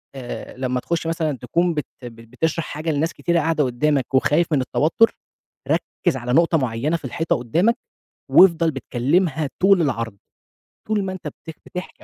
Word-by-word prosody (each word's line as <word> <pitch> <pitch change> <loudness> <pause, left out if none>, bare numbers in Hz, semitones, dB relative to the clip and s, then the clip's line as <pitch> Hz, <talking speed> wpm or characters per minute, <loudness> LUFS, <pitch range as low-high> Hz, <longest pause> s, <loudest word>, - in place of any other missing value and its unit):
آآ، 130 -1 -7
لمّا 125 -1 -1
تخُش 165 +5 -2
مثلًا 160 -4 -1
تكون 170 +5 0
بت 150 -2 -2 0.2
بت 115 -1 -10
بتشرَح 160 +6 -1
حاجة 155 +3 -4
لناس 155 +3 0
كتيرة 170 0 0
قاعدة 160 -1 +1
قُدّامك 135 +1 0
وخايف 150 +5 +3
من 135 - +3
التوتُّر، 160 - +2 0.5
ركِّز 170 -7 0
على 125 0 -3
نُقطة 165 +1 +4
معيّنة 130 +5 -1
في 145 - -11
الحيطة 165 +6 -1
قُدّامك، 170 - +1 0.5
وافضَل 170 -3 +6
بتكلِّمها 145 +4 0
طول 190 -1 +5
العرض، 115 -8 -2 0.7
طول 215 -2 0
ما 190 - -3
أنت 185 - -7
بت 160 -2 -10
بتحكي 180 +1 -8
155 Hz, 160 wpm, -22 LUFS, 130-170 Hz, 0.7 s, وافضَل